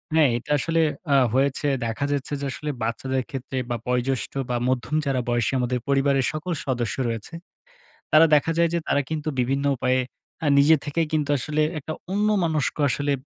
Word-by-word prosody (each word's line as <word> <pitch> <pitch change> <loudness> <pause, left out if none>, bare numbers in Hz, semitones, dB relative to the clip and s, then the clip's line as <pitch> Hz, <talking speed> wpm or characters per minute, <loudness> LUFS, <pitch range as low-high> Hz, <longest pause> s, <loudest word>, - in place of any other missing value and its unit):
হ্যাঁ, 150 -5 +5
এটা 135 +5 -7
আসলে 165 +3 +1 0.3
আ - - +5 0.2
হয়েছে 140 +2 +1 0.2
দেখা 115 +5 -2
যাচ্ছে 145 +1 -2
যে, - - -2
আসলে 150 +2 -5
বাচ্চাদের 130 +3 -1
ক্ষেত্রে 130 0 -5
বা 120 - 0
বয়োজষ্ঠ 125 +1 -1 0.2
বা 120 - 0
মধ্যম 130 +4 -1
যারা 130 -2 0
বয়সী 120 +1 +1
আমাদের 125 0 0
পরিবারের 135 -1 +2
সকল 155 +4 -4
সদস্য 120 -4 -1
রয়েছে। 115 +7 -5 0.8
তারা 160 +1 +8
দেখা 155 +3 +3
যায় 170 0 +4
যে, - - +2
তারা 145 - +3
কিন্তু 155 -1 -3
বিভিন্ন 135 +3 0
উপায়ে 130 +1 +1 0.4
আ - - +1
নিজে 155 +3 +6
থেকেই 155 +2 0
কিন্তু 150 -2 0
আসলে 155 +4 0 0.2
একটা 155 +2 -6 0.2
অন্যমনস্ক 190 -8 +1
আসলে 145 +3 0
140 Hz, 170 wpm, -24 LUFS, 130-155 Hz, 0.8 s, তারা